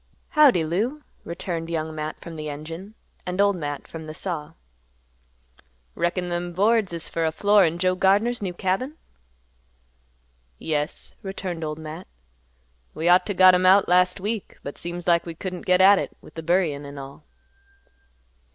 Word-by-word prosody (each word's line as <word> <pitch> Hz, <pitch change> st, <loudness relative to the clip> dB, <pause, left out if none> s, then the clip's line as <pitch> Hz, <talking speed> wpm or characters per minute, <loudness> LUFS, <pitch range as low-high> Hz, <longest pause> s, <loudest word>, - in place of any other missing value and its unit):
"Howdy, 280 Hz, -, +5 dB
Lou," 230 Hz, -, -2 dB, 0.2 s
returned 170 Hz, -1 st, -4 dB
Young 160 Hz, -1 st, -2 dB
Matt 155 Hz, 0 st, -5 dB
from 170 Hz, -, -9 dB
the 155 Hz, -1 st, -5 dB
engine, 165 Hz, +8 st, -8 dB, 0.3 s
and 180 Hz, +1 st, -4 dB
Old 200 Hz, 0 st, +4 dB
Matt 145 Hz, -4 st, -5 dB
from 160 Hz, -1 st, -8 dB
the 155 Hz, -, -7 dB
saw. 165 Hz, -5 st, -4 dB, 1.4 s
"Reckon 175 Hz, +1 st, -1 dB
them 175 Hz, 0 st, -3 dB
boards 210 Hz, +1 st, +2 dB
is 170 Hz, -1 st, -4 dB
fer 165 Hz, -, -2 dB
a 160 Hz, -, +1 dB
floor 205 Hz, +3 st, +4 dB
in 165 Hz, +1 st, -1 dB
Joe 185 Hz, +1 st, +2 dB
Gardner's 205 Hz, +6 st, +2 dB
new 185 Hz, -3 st, -3 dB
cabin?" 200 Hz, -, -2 dB, 1.6 s
"Yes," 150 Hz, -, -3 dB
returned 190 Hz, -4 st, -5 dB
Old 150 Hz, -1 st, -3 dB
Matt; 160 Hz, +3 st, -8 dB, 0.9 s
"we 160 Hz, -, -2 dB
ought 180 Hz, +1 st, +5 dB
to 205 Hz, -, -2 dB
got 185 Hz, 0 st, +8 dB
'em 180 Hz, 0 st, +3 dB
out 195 Hz, +1 st, +6 dB
last 180 Hz, +1 st, +3 dB
week, 210 Hz, +1 st, -4 dB
but 140 Hz, -, -5 dB
seems 175 Hz, 0 st, -4 dB
like 170 Hz, -1 st, +2 dB
we 165 Hz, -, -6 dB
couldn't 180 Hz, +1 st, -6 dB
get 180 Hz, 0 st, +4 dB
at 195 Hz, +1 st, +7 dB
it -, -, -5 dB
with -, -, -16 dB
the 165 Hz, -, -6 dB
buryin' 165 Hz, -4 st, +1 dB
an' 140 Hz, 0 st, -9 dB
all." 135 Hz, 0 st, -10 dB
175 Hz, 165 wpm, -24 LUFS, 160-190 Hz, 1.6 s, got